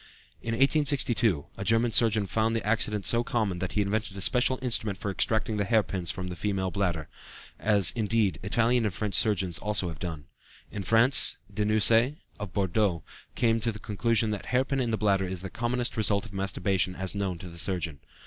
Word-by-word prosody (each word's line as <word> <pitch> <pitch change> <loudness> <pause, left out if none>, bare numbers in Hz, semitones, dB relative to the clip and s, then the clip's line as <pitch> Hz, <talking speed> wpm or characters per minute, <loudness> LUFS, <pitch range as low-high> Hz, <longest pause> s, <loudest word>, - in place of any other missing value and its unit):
In 115 - -3
1862, 130 - +2
a 95 - -4
German 115 +3 +2
surgeon 110 -3 +2
found 110 +3 0
the 115 - -2
accident 105 -2 0
so 120 0 +2
common 105 -7 -1
that 95 0 -4
he 105 - +1
invented 100 0 -3
a - - -5
special 125 +5 +3
instrument 110 -5 0
for 100 +1 -4
extracting 110 +2 -1
hair 110 +2 +2
pins 90 -4 -3
from 90 0 -3
the 90 - -6
female 95 0 -2
bladder, 85 -6 -2 0.5
as, 100 -4 +3
indeed, 110 -3 0
Italian 120 +4 +2
and 100 -4 -2
French 105 0 -3
surgeons 95 -6 +2
have - - -13
also 105 -5 -1
done. 80 -1 -7 0.5
In 100 - -5
France, 115 +7 +4 0.2
Denucé, 110 +5 +3 0.2
of 105 -3 -6
Bordeaux, 95 -3 0 0.3
came 115 -1 +2
to 115 +1 0
the 105 - -8
conclusion 110 +1 0
that 105 - -5
hair 125 +2 +1
pin 135 0 -2
in 120 -3 0
the 110 - 0
bladder 100 -3 +1
is 90 0 -5
the 95 - -6
commonest 120 +1 -2
result 105 -2 0
of 105 - -12
masturbation 95 -1 -1
as 95 0 -4
known 100 -3 -2
to 90 - -10
the 85 -1 -8
surgeon. 85 -6 -2
105 Hz, 195 wpm, -27 LUFS, 95-115 Hz, 0.5 s, France